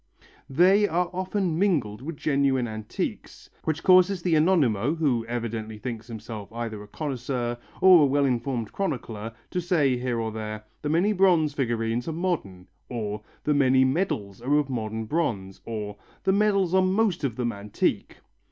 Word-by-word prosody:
They 185 +9 +5
are 175 +1 0
often 185 -2 -1
mingled 140 - +1
with 155 +2 -6
genuine 140 -4 +1
antiques, 110 -1 -5
which 155 -1 0
fact - - -19
causes 185 0 +5
the 175 - +1
Anonimo, 150 - +3
who 135 -8 +1
evidently 115 -2 -4
thinks 115 0 -6
himself 110 -3 -8
either 115 -2 -5
a 105 - -11
connoisseur 125 -2 -3 0.3
or 185 -3 +8
a - - +6
well 140 +1 +2
informed 120 -3 -1
chronicler, 115 - -3 0.2
to 180 - -1
say 150 -7 +2
here 120 -1 -2
and 110 -1 -3
there, 110 -1 -5 0.2
"the 145 - -2
many 175 +7 +2
bronze 175 -6 +3
figurines 120 -3 -1
are 165 - -2
modern," 155 - -3 0.2
or 105 -3 -4 0.2
"the 150 - +2
many 130 -2 +4
medals 130 - -1
are 135 +4 +1
of 145 -2 0
modern 110 -2 -3
bronze," 110 - -2
or 105 -3 -5 0.3
"the 190 - +3
medals 200 -3 +2
are 190 - +5
most 185 -2 +1
of 130 -5 -1
them 120 -1 -1
antique." 100 0 -2
130 Hz, 165 wpm, -26 LUFS, 115-170 Hz, 0.3 s, or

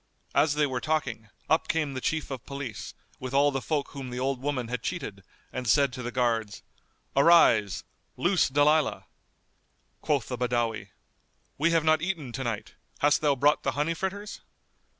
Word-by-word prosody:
As 150 -1 +3
they 150 0 +3
were 130 -3 -3
talking, 125 -8 -2 0.2
up 160 - +2
came 155 -4 0
the 130 - -4
Chief 155 0 -2
of 130 -3 -5
Police, 140 -6 -6 0.2
with 130 +1 -5
all 145 +1 +5
the 135 -1 -2
folk 145 +1 -1
whom 135 -2 -7
the 125 0 -5
old 130 0 -1
woman 135 -4 -2
had 125 0 -3
cheated, 105 - -5 0.3
and 125 -1 -4
said 140 +4 +4
to 125 - -6
the 120 0 -4
guards, 115 -4 -1 0.5
"Arise, 135 - +5 0.3
loose 175 -2 +2
Dalilah." 145 +2 +2 1.0
Quoth 140 -6 0
the 125 -2 -4
Badawi, 120 -3 -1 0.7
"We 165 +3 +3
have 165 -2 +2
not 155 -1 +3
eaten 165 -8 -3
to 130 +3 -4
night. 115 -4 -4 0.2
Hast 145 0 +3
thou 145 -2 +3
brought 145 +3 +3
the - - -1
honey 150 +3 0
fritters?" 200 +4 -5
140 Hz, 170 wpm, -27 LUFS, 125-155 Hz, 1.0 s, all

